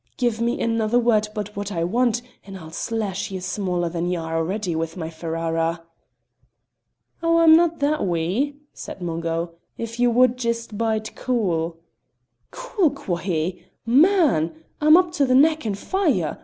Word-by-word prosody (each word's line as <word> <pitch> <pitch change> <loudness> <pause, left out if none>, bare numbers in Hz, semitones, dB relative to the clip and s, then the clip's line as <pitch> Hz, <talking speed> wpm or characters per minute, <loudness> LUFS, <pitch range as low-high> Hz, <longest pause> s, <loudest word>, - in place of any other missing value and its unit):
Give 240 -3 0
me 235 +1 0
another 225 0 +1
word 225 -3 +3
but 210 0 -5
what 205 0 -4
I 165 -3 -1
want 240 +5 +1 0.2
and 195 -1 -9
I'll 160 -3 -11
slash 205 +1 -3
ye 190 -1 -5
smaller 180 -1 -2
than 170 +1 -2
ye 180 - 0
are 165 -1 -4
already 180 +2 -1
with 165 +2 -3
my 160 -2 -5
Ferrara." 165 0 -2 1.4
"Oh, 335 0 +3
I'm 325 -1 +7
no' 345 +1 +5
that 305 -5 -1
wee!" 185 - 0 0.2
said 185 - -8
Mungo. 165 0 -2 0.3
"If 230 +1 -6
ye 245 - +4
wad 250 +1 +4
jist 235 -2 -3
bide 220 0 -2
cool 175 -10 -1 0.4
" - - -49
"'Cool' 480 -9 0
quo' 210 -11 -4
he! 175 0 -2 0.2
Man! 240 - +3 0.2
I'm 305 +2 +7
up 360 -2 +2
to 290 -5 +1
the 255 - +3
neck 310 -1 +4
in 205 - -1
fire. 260 - 0
210 Hz, 165 wpm, -23 LUFS, 170-255 Hz, 1.4 s, I'm